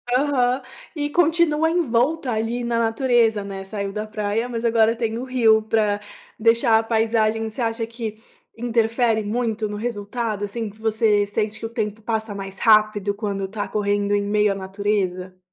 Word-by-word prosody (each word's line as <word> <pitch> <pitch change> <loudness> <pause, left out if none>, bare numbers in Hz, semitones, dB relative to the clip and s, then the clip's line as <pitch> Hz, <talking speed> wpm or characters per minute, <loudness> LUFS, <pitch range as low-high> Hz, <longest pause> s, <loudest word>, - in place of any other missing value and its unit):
Aham. 255 -2 +2 0.3
E 290 -1 -2
continua 320 -1 +3
em 350 +2 +2
volta 260 +1 0
ali 225 +2 -2
na 235 -1 0
natureza, 225 -2 +2
né. 195 -1 -7
Saiu 200 0 -4
da 210 +1 -4
praia, 215 +2 -2
mas 235 -2 -4
agora 225 -1 +3
tem 230 -1 -2
o 250 - -4
rio 230 -4 +4
pra 215 -2 +1 0.4
deixar 230 0 +4
a - - -2
paisagem 225 -1 +1
você 220 +4 -6
acha 225 0 -1
que 225 -2 -6 0.4
interfere 230 -1 +1
muito 220 0 -1
no 210 - -5
resultado, 215 -1 -3
assim, 220 +2 -4
que 210 +2 -17
você 220 -2 +2
sente 210 +1 -2
que - - -5
o - - -4
tempo 220 -2 -3
passa 220 -1 -2
mais 195 -1 -7
rápido 215 -2 +3
quando 200 -2 -3
tá 205 +1 -4
correndo 205 -1 0
em 205 - +1
meio 210 0 +2
à - - -7
natureza? 190 -2 -2
220 Hz, 175 wpm, -22 LUFS, 205-235 Hz, 0.4 s, rio